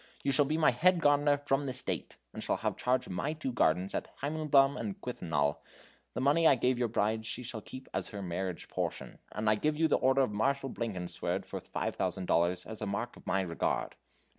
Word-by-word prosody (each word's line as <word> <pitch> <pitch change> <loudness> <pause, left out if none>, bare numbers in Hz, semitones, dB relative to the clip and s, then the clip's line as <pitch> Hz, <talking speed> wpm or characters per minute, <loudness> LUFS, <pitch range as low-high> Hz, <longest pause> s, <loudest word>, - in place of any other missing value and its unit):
You 140 - +2
shall 145 +1 +5
be 155 +3 0
my 160 - +5
head 175 +8 +4
gardener 145 -2 +4
from 140 0 +1
this 130 -1 -2
date, - - -3 0.2
and - - -6
have - - -1
charge 125 +1 +1
of - - -8
my 145 +12 -1
two 155 -4 -4
gardens 90 -5 +2
at - - -2 0.2
Heimleben 145 -2 +3
and 195 +2 -4
Quellenthal. 75 - -1 0.6
The - - -1
money 150 +5 +4
I 140 - +7
gave 125 0 +1
your 120 - +2
bride 110 0 0
she 115 +3 -4
shall 115 -2 -5
keep 130 +4 -9
as 95 0 -1
her 100 -1 -6
marriage 90 0 -3
portion, - - -4
and 105 +2 -3
I 105 - +6
give 150 +8 0
you 160 +1 +4
the - - +3
order 135 +1 +4
of 125 - -1
Marshal 135 +5 0
Blankenswerd 95 -7 -3
for - - -6
five - - -3
thousand 95 - -1
dollars, 90 +1 +2
as 110 -1 -7
a 105 - -2
mark 110 +5 -3
of - - -16
my 95 - +2
regard. 85 -3 -1
125 Hz, 215 wpm, -31 LUFS, 100-145 Hz, 0.6 s, I